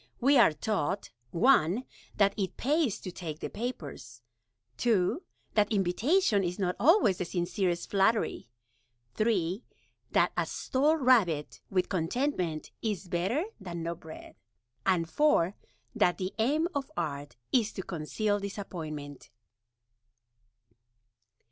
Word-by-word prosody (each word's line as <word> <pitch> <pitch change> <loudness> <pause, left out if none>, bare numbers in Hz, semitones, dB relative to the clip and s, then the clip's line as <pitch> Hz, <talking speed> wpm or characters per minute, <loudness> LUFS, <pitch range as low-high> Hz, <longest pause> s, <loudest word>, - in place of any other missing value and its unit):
We 270 +2 +5
are 230 - +7
taught 180 - -2 0.2
(1) 190 - +3 0.3
that 200 -1 +4
it 195 -3 -3
Pays 285 - +1
to 185 - -6
take 160 -4 -6
the - - -5
Papers; 145 - -6 0.5
(2) 220 - +2 0.3
that 210 -1 +2
Invitation 210 - +2
is 175 0 -2
not 180 -3 0
Always 300 - +5
the 180 - -1
Sincerest 175 0 -1
Flattery; 200 - +1 0.6
(3) 200 - 0 0.5
that - - +4
a - - 0
Stalled 300 +4 +1
Rabbit 195 - +3
with 185 -2 +1
Contentment 180 - -1
is 205 -4 -2
better 190 - 0 0.2
than 175 -4 -6
No 170 +1 -2
Bread; 160 -2 -12 0.5
and 175 -3 +2
(4) 190 - +3 0.4
that 175 - +2
the 185 0 -3
Aim 295 +9 +2
of 280 -2 -3
Art 145 -5 -3 0.2
is 225 -4 +2
to 190 - -5
Conceal 205 +6 -1
Disappointment. 160 -8 -6
190 Hz, 120 wpm, -30 LUFS, 170-235 Hz, 0.6 s, are